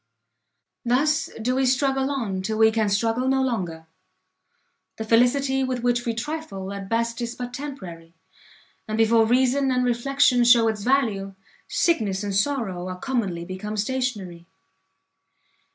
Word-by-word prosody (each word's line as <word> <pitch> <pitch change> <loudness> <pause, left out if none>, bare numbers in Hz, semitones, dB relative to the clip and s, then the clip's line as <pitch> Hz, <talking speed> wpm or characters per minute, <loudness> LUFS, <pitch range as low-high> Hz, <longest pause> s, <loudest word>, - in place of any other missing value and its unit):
Thus 280 +6 +1
do 245 +3 0
we 265 0 +1
struggle 270 +1 +1
on 220 -9 -2
till 215 +3 -3
we 220 0 +5
can 220 -2 0
struggle 225 +5 0
no 265 0 +2
longer; 180 -10 -3 1.1
the 220 - -4
felicity 265 +4 +2
with 255 -2 -3
which 245 0 0
we 230 - -1
trifle, 230 -8 -5
at 195 -1 -7
best 230 +1 -1
is 235 0 -4
but 245 0 -6
temporary; 180 - -8 0.7
and 215 0 -3
before 225 0 +4
reason 260 +3 +2
and 250 0 +1
reflection 250 +1 +2
shew 235 -1 +6
its 220 -2 -1
value, 210 -6 0 0.3
sickness 215 - 0
and 200 -1 -3
sorrow 200 -6 -1
are 185 0 -5
commonly 195 -8 -2
become 190 +4 -6
stationary. 205 -7 -3
235 Hz, 140 wpm, -24 LUFS, 200-260 Hz, 1.1 s, shew